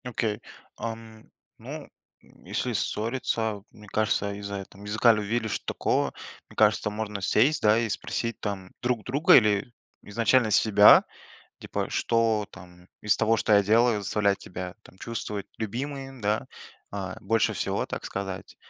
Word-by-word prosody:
Окей. 115 -3 -2 0.4
Ам. 115 -1 -7 0.3
Ну, - - -8 0.3
если - - -5
ссориться, 110 -2 -2
мне 105 0 -15
кажется, 100 -1 0
из-за 100 0 -6
этом 100 0 -9
языка 110 +3 +4
ли 105 -1 -2
вили, 110 +2 -1
что 110 - -3
такого. - - 0 0.4
Мне - - -16
кажется, - - +3
можно 105 -1 -4
сесть, 135 +11 +3
да, 105 +1 +5
и 115 0 +1
спросить, 115 +2 -3
там, 95 -3 -5
друг 120 -3 0
друга. 140 +8 +4
Или 105 0 +3 0.3
изначально 115 +2 +2
себя, 105 -1 +7 0.6
типа: - - -4
"Что, 115 -2 +1
там, 90 -1 -15
из 105 -1 +2
того 115 +1 +2
что 110 - +2
я 100 0 +6
делаю 110 +1 +3
заставлять 100 0 +1
тебя, 90 0 -7
там, 95 - -18
чувствовать 105 -3 -5
любимой, 135 +5 -4
да? 105 +1 0 0.5
А, 95 -2 -5
больше 115 +3 +1
всего, - - -1
так - - -5
сказать". 95 -1 -6
105 Hz, 150 wpm, -26 LUFS, 100-115 Hz, 0.6 s, себя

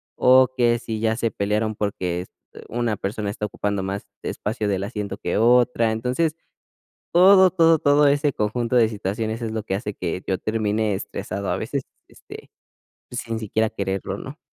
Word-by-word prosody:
o 130 +1 +6
que 120 -2 +3
si 110 -2 -4
ya 110 0 +1
se 115 - 0
pelearon, 105 +2 -1
porque 90 -4 -2
es 90 - -9 0.3
eh, - - -11
una 120 -2 -1
persona 100 +2 -3
está 105 +1 -3
ocupando 100 -1 -2
más 95 +1 -4 0.2
espacio 105 0 -3
del 95 -1 -1
asiento 100 -2 -5
que - - -3
otra. 120 0 +4
Entonces, 125 +8 -1 0.8
todo, 190 +1 +7
todo, 165 -2 +4
todo 145 0 +4
ese 145 +1 +2
conjunto 115 +3 -1
de 115 -2 +5
situaciones 110 +2 -3
es 115 - -2
lo 110 -1 -3
que 95 - -3
hace 105 0 -5
que 90 +1 -4
yo 95 - 0
termine 110 0 0
estresado. 95 +1 -5
A - - 0
veces, - - -3 0.3
este, - - -13 0.6
pues, 125 - -3
sin 115 -1 -4
siquiera 110 0 0
quererlo, 95 -2 -3
¿no? - - -9
110 Hz, 180 wpm, -23 LUFS, 100-125 Hz, 0.8 s, todo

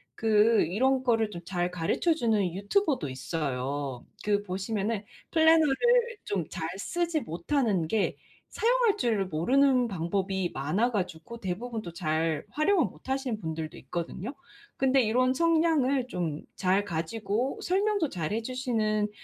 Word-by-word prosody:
그 220 0 +4
이런 260 +10 +1
거를 225 -4 +2
좀 175 -4 -7
잘 175 -1 -1
가르쳐 180 - +1
주는 220 - +1
유튜버도 255 - +1
있어요. 135 -1 -3 0.2
그 205 -1 +2
보시면은 205 +2 -2 0.3
플래너를 320 -3 +5 0.5
좀 185 -5 -1
잘 160 - -4
쓰지 340 +7 -1
못하는 180 - 0
게 215 +3 0 0.3
사용할 470 -2 +2
줄 220 - +1
모르는 250 - +3
방법이 190 0 -1
많아 170 - +1
가지고 200 0 -4
대부분 220 +5 -4
또 170 - -8
잘 160 -2 -1
활용을 335 +4 +2
못하시는 265 -4 -3
분들도 160 -3 -5
있거든요? 175 - -5 0.4
근데 265 0 +3
이런 255 +4 +2
성향을 315 -5 +2
좀 170 -8 -3
잘 190 +2 +2
가지고 205 +7 -2
설명도 395 -2 +1
잘 170 -6 -3
해 225 - 0
주시는 225 -4 0
215 Hz, 280 characters per minute, -28 LUFS, 175-265 Hz, 0.5 s, 플래너를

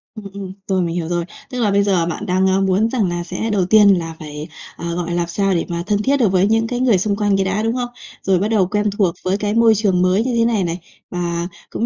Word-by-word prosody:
Ừm, 215 - -9
ừm, 195 -2 -7 0.2
rồi, 190 -2 +1
mình 170 -1 -2
hiểu 170 -2 -2
rồi. 175 0 -1 0.2
Tức 250 - -5
là 210 -3 +2
bây 200 0 +3
giờ 190 -4 +2
bạn 175 +5 -4
đang, 190 0 +2
a, 190 +1 +2
muốn 195 +3 +2
rằng 220 -7 0
là 175 0 -3
sẽ 185 +6 -4
đầu 195 -4 +1
tiên 200 -2 +5
là 165 -1 -6
phải, 150 0 -7 0.3
ờ, 170 0 -4
gọi 175 -1 -3
là, - - -2
làm 175 -1 0
sao 195 +2 0
để 170 - 0
mà 170 0 -3
thân 205 -1 +1
thiết 280 +1 +2
được 225 -8 +2
với 185 0 +3
những 225 +1 +2
cái 245 +1 -3
người 245 -6 +3
xung 200 +2 0
quanh 205 -1 +1
cái 195 - +1
đã, 195 +3 -1
đúng 225 +2 0
không? 245 -1 -2 0.3
Rồi 190 -2 +2
bắt 200 - 0
đầu 215 -5 +2
quen 210 +2 0
thuộc 185 -5 +2
với 190 +2 0
cái 210 0 -2
môi 230 -1 +5
trường 195 -4 +1
mới 185 +4 +2
như 250 -1 -1
thế 230 - +3
này 225 -4 +1
này, 170 0 -3 0.3
và 175 -1 -2 0.2
cũng 230 - -2
195 Hz, 290 wpm, -19 LUFS, 175-215 Hz, 0.3 s, tiên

